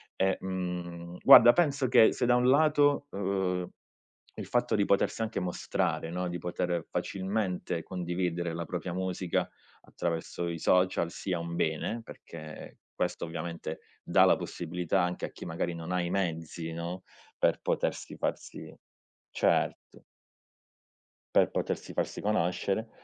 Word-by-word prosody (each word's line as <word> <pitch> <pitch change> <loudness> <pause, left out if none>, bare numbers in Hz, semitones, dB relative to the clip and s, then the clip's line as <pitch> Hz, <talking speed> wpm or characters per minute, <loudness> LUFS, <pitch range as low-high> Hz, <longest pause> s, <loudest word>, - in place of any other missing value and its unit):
e, 95 0 +1
mhmm, 90 -2 -5
guarda 120 - +10
penso 145 -6 +2
che 115 -2 +6
se 125 - 0
da 120 - +5
un 125 0 +3
lato, 145 0 +4
uhm, 95 -2 -1 0.7
il - - -6
fatto 120 0 +1
di 100 -1 +2
potersi 100 +3 +1
anche 110 0 -2
mostrare, 90 -2 -1
no, 90 +1 -2
di 90 0 -3
poter 90 -1 -2
facilmente 95 -3 -2
condividere 85 -1 -2
la 85 0 -4
propria 90 -1 -4
musica 90 -1 -1 0.3
attraverso 85 0 -3
i 85 -1 -4
social 90 -1 +2
sia 90 -1 -3
un 85 0 -5
bene, 85 +8 -1
perché 75 -7 -10 0.2
questo - - -2
ovviamente 80 -1 -5 0.2
dà - - +5
la - - +5
possibilità 90 +2 -2
anche 90 0 -1
a - - -6
chi - - -10
magari 85 0 -2
non 85 +1 -6
ha 90 0 +1
i 85 - -2
mezzi, 80 -3 -2
no, 85 +3 -5 0.3
per - - +2
potersi - - -2
farsi - - -4 0.6
certo. - - 0 1.3
Per - - +5
potersi - - -3
farsi - - -2
conoscere 100 +2 0
90 Hz, 140 wpm, -30 LUFS, 85-100 Hz, 1.3 s, guarda